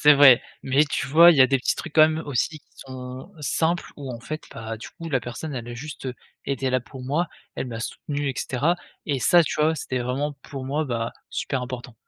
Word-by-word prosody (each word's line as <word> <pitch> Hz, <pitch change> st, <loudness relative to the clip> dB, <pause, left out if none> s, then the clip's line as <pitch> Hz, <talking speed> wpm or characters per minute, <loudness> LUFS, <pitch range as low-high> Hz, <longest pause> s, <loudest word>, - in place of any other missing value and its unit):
C'est 150 Hz, 0 st, +8 dB
vrai, 140 Hz, -3 st, +8 dB, 0.2 s
mais 135 Hz, +3 st, +4 dB
tu 140 Hz, -3 st, -2 dB
vois? 165 Hz, +5 st, +8 dB
Il 165 Hz, -, +4 dB
y 135 Hz, -, +5 dB
a 130 Hz, -, +9 dB
des 135 Hz, -, +3 dB
petits -, -, 0 dB
trucs, 155 Hz, -, -6 dB
quand 160 Hz, -, +6 dB
même, 155 Hz, -, -2 dB
aussi, 145 Hz, +4 st, -1 dB
qui -, -, -36 dB
sont 130 Hz, +5 st, -9 dB
simples, 160 Hz, +5 st, 0 dB
où 140 Hz, -3 st, -6 dB
en 115 Hz, -, -6 dB
fait, 155 Hz, +6 st, -6 dB
bah, 115 Hz, 0 st, -5 dB
du 110 Hz, -, -9 dB
coup, 165 Hz, 0 st, -8 dB
la 135 Hz, -4 st, +1 dB
personne, 130 Hz, +5 st, -6 dB
elle 120 Hz, -1 st, -5 dB
a 120 Hz, -, -6 dB
juste 140 Hz, +1 st, -6 dB, 0.4 s
été 135 Hz, -1 st, -1 dB
là 130 Hz, 0 st, +2 dB
pour 130 Hz, +1 st, -11 dB
moi, 155 Hz, +6 st, 0 dB, 0.3 s
elle -, -, -3 dB
m'a 115 Hz, -, -5 dB
soutenu, 145 Hz, +4 st, -3 dB
et 135 Hz, -, -2 dB
cetera, 145 Hz, +7 st, +1 dB, 0.3 s
et 140 Hz, -4 st, 0 dB
ça, 170 Hz, +5 st, +6 dB
tu -, -, -2 dB
vois? 160 Hz, +1 st, +3 dB
C'était 130 Hz, -2 st, -3 dB
vraiment, 135 Hz, +4 st, -1 dB
pour 135 Hz, -2 st, -7 dB
moi, 145 Hz, +4 st, -1 dB
bah, 115 Hz, -4 st, -2 dB, 0.2 s
super 135 Hz, -2 st, -2 dB
important. 125 Hz, -1 st, -6 dB
135 Hz, 240 wpm, -24 LUFS, 125-150 Hz, 0.4 s, a